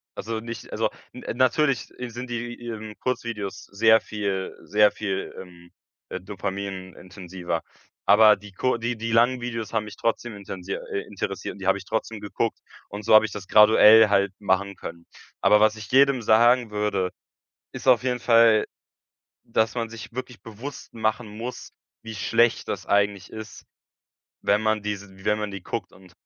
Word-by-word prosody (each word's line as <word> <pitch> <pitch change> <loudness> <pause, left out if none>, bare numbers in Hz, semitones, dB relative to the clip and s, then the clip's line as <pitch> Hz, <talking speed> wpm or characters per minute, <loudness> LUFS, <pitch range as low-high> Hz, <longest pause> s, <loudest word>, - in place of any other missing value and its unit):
also 110 +2 -4
nicht 115 +1 -8
also - - 0 0.2
n - - -11
natürlich 130 +1 +2
sind 125 0 -6
die, 120 0 -4
ähm, 110 -2 -6
Kurzvideos 115 -6 -4
sehr 110 +2 +4
viel 100 -3 -4
sehr 105 0 +4
viel, 100 -3 -4
ähm, 85 -1 -13 0.4
äh, 90 - -5
dopaminintensiver, 95 -3 -5 0.4
aber 105 +1 +7
die 105 0 -14
ku 130 +6 0
die 120 +1 -2
die 115 +1 -3
langen 120 +2 +3
Videos 115 -2 -5
haben 110 -1 +1
mich 105 - -10
trotzdem 115 -1 -2
intensier 95 -1 -6
äh, 100 - -2
interessiert 95 -2 -5
und - - -14
die 95 - -5
habe 95 - +4
ich 95 - -10
trotzdem 110 0 -3
geguckt 105 +2 -2 0.3
und 100 +1 -7
so - - +2
habe 110 0 +8
ich 110 - -5
das 100 -2 -8
graduell 110 +1 +8
halt 100 -1 +2
machen 100 0 0
können. 85 0 -9 0.4
Aber 105 +2 +5
was 110 0 +4
ich 110 -1 -10
jedem 135 -1 +5
sagen 115 +1 +4
würde, 100 -3 -1 0.6
ist - - -8
auf 125 -1 +5
jeden 125 -1 -1
Fall, 115 -2 +5 0.8
dass 110 0 0
man 115 -1 -2
sich 115 0 -10
wirklich 125 0 -7
bewusst 115 +6 -9
machen 110 +1 -1
muss, 115 +4 -7 0.3
wie 110 0 -8
schlecht 115 +4 +1
das - - -4
eigentlich 100 -2 +1
ist, 110 -1 -9 0.8
wenn 105 +1 +2
man 110 -1 +1
diese 100 -2 -6
wenn 105 0 +2
man 105 -1 -3
die 100 -2 -8
guckt - - -5
und 90 -1 -18
105 Hz, 170 wpm, -24 LUFS, 100-115 Hz, 0.8 s, habe